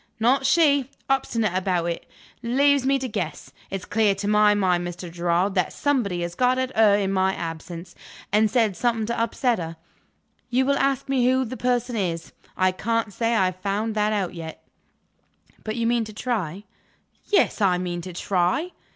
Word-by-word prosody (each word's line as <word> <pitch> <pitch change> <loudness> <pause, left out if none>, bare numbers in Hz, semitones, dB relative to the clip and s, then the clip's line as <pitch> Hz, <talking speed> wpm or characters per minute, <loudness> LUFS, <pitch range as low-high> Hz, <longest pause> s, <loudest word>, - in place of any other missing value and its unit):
"Not 260 +4 +3
she! 285 -4 +3 0.2
Obstinate 230 -7 0
about 180 -2 0
it. 170 -1 -4 0.3
Leaves 270 +3 +2
me 275 0 +3
to 265 -1 -3
guess. 220 - -5 0.2
It's 195 -1 -5
clear 210 -2 +2
to 200 +1 -4
my 210 0 +4
mind, 180 -3 +1
Mr. 175 0 -7
Gerard, 175 +3 0
that 185 -2 0
somebody 220 -12 0
has 170 0 -4
got 250 +6 +2
at 260 0 -2
her 215 -2 +5
in 195 -1 0
my 190 0 +2
absence, 170 +1 -7 0.4
and 215 +1 +4
said 225 -5 +2
something 230 -1 0
to 235 +1 -2
upset 230 0 +1
her. 165 -1 -6 0.7
You 255 +2 +2
will 280 +1 +2
ask 275 -1 0
me 260 -2 +2
who 260 0 +2
the 255 +2 -6
person 245 -1 0
is. 170 -5 -3 0.2
I 185 0 +3
can't 225 +3 -2
say 230 +2 0
I 190 - +3
have 185 0 -3
found 205 +3 -1
that 210 0 +1
out 195 -4 -1
yet." 165 -2 -8 1.0
"But 215 0 -3
you 230 -1 -1
mean 235 0 +2
to 215 - -10
try?" 205 -6 -3 0.6
"Yes; 405 - +2
I 185 -3 +3
mean 175 -1 -3
to 180 +1 -8
try." 185 - 0
210 Hz, 185 wpm, -24 LUFS, 180-245 Hz, 1.0 s, her